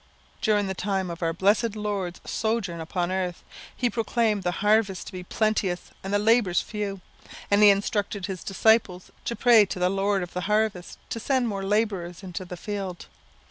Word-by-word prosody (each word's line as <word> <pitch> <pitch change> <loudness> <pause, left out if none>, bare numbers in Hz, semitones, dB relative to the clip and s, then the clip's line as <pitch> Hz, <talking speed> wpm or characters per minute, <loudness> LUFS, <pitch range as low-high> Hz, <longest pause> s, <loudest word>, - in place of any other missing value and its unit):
During 210 -2 +2
the 190 - -2
time 190 -1 -2
of 170 - -8
our 165 -1 +1
blessed 205 +6 +2
Lord's 200 -4 -3
sojourn 220 -7 -1
upon 175 +2 -2
earth, 185 -2 -2 0.3
he 250 - +1
proclaimed 225 -2 0
the 180 - 0 0.2
harvest 205 -3 +2
to - - -8
be 185 - -5
plenteous 195 -2 -1
and 195 - -4
the 205 - +3
labourers 210 -3 +3
few; 205 -3 -4 0.5
and 200 +1 +5
he 210 - +9
instructed 200 -1 0
his 190 -2 -5
disciples 195 -2 +2
to 235 - -2
pray 235 -3 +6
to - - -5
the 180 0 +2
Lord 195 0 +1
of 175 - -8
the 180 - -2
harvest 210 -4 0
to 230 - -2
send 255 +1 +1
more 200 -3 -3
labourers 195 -3 -1
into 185 0 -6
the 180 0 -8
field. 195 -2 -5
200 Hz, 180 wpm, -26 LUFS, 180-215 Hz, 0.5 s, he